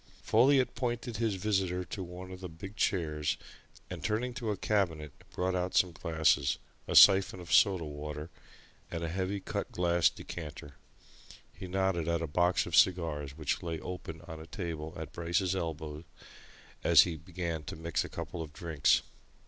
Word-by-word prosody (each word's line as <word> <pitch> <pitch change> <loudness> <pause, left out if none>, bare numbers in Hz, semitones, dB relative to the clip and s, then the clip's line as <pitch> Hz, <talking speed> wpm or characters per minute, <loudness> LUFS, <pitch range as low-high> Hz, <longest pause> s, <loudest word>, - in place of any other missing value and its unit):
Folliot 130 +3 +4
pointed 120 -2 -3
his 110 -3 0
visitor 95 -2 0
to 100 - -6
one 90 +1 -8
of 95 - -8
the 90 -1 -6
big 90 +6 -9
chairs 75 -8 0 0.5
and - - -7
turning 120 +4 -1
to 120 -3 -4
a 105 - -1
cabinet 85 -8 0 0.2
brought 90 +1 -1
out 90 0 -1
some 90 - +4
glasses, 80 -5 +2 0.3
a - - -2
syphon 95 -1 +8
of 85 -1 -5
soda 95 -5 +5
water, 75 +1 -6 0.6
and 85 -1 -4
a 85 - -2
heavy 95 +3 -2
cut - - -4
glass 85 -1 +3
decanter. 75 -3 -8 0.8
He 95 +1 -8
nodded 95 -3 0
at 85 0 +1
a - - 0
box 90 +4 +2
of 85 - -2
cigars 75 -6 +2
which 75 -3 -1
lay 80 -2 -3
open 80 -3 -7
on 80 -1 -9
a 80 - -10
table 80 -2 -5
at 80 -1 -7
Bryce's 85 +2 0
elbow 80 -3 -4 0.8
as - - +8
he 85 - -3
began 85 0 -4
to - - -6
mix 80 -1 -1
a - - -7
couple 85 - -5
of 75 -2 -7
drinks. 80 -3 +2
85 Hz, 170 wpm, -31 LUFS, 80-95 Hz, 0.8 s, syphon